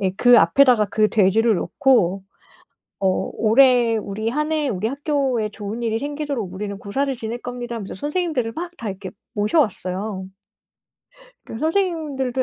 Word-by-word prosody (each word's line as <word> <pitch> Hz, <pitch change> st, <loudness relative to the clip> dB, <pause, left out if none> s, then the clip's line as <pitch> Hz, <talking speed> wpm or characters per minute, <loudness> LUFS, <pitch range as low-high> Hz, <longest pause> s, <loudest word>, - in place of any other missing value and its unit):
예 190 Hz, -2 st, +1 dB
그 245 Hz, +2 st, +6 dB
앞에다가 230 Hz, +5 st, +4 dB
그 215 Hz, +2 st, +2 dB
돼지를 220 Hz, +2 st, +3 dB
놓고 205 Hz, -, +2 dB, 0.8 s
어 195 Hz, -, +1 dB, 0.3 s
"올해 240 Hz, 0 st, +4 dB
우리 215 Hz, +1 st, -3 dB
1 300 Hz, +5 st, -1 dB
해 305 Hz, -3 st, 0 dB
우리 210 Hz, -1 st, -2 dB
학교에 275 Hz, -4 st, -1 dB
좋은 210 Hz, +2 st, -6 dB
일이 225 Hz, -1 st, 0 dB
생기도록 285 Hz, -8 st, -4 dB
우리는 200 Hz, +1 st, -5 dB
고사를 270 Hz, +7 st, -2 dB
지낼 230 Hz, 0 st, -5 dB
겁니다." 245 Hz, -1 st, -6 dB
하면서 205 Hz, -4 st, -6 dB
선생님들을 295 Hz, -, -2 dB
막 345 Hz, +5 st, -5 dB
다 225 Hz, -, -5 dB
이렇게 190 Hz, -1 st, -7 dB, 0.2 s
모셔왔어요. 205 Hz, -, -1 dB, 1.2 s
그 225 Hz, -, -8 dB
선생님들도 310 Hz, -6 st, -1 dB
235 Hz, 320 characters per minute, -21 LUFS, 210-280 Hz, 1.2 s, 그